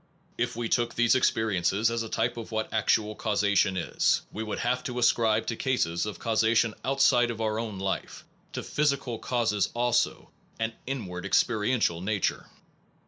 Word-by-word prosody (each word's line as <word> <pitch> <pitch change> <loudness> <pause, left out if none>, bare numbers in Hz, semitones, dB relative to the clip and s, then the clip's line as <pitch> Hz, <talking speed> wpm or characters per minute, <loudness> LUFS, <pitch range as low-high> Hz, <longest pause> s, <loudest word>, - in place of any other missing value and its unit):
If - - -2
we 120 0 -2
took 120 0 0
these 120 -1 +4
experiences 110 -3 +1
as 115 0 -1
the 115 - -5
type 120 +2 0
of 115 -1 -8
what 110 0 -3
actual 110 -1 +1
causation 100 -3 +1
is, 85 - +1
we 110 - -4
should 105 - -4
have 125 +1 -1
to 125 -1 -4
as 120 - +5
cribe 110 -2 +1
to 115 - -2
cases 95 -9 0
of 105 - -5
causation 115 0 +2
outside 130 -2 +3
of 115 -1 -5
our 110 -1 -1
own 110 -4 -4
life, 95 0 -4 0.3
to - - -4
physical 140 -6 -1
cases 115 -5 0
also, 120 0 0 0.3
an 115 0 -1
inwardly 100 -8 -4
experi 105 0 +2
ential 85 -8 0
nature. 105 0 -1
110 Hz, 170 wpm, -27 LUFS, 105-120 Hz, 0.3 s, as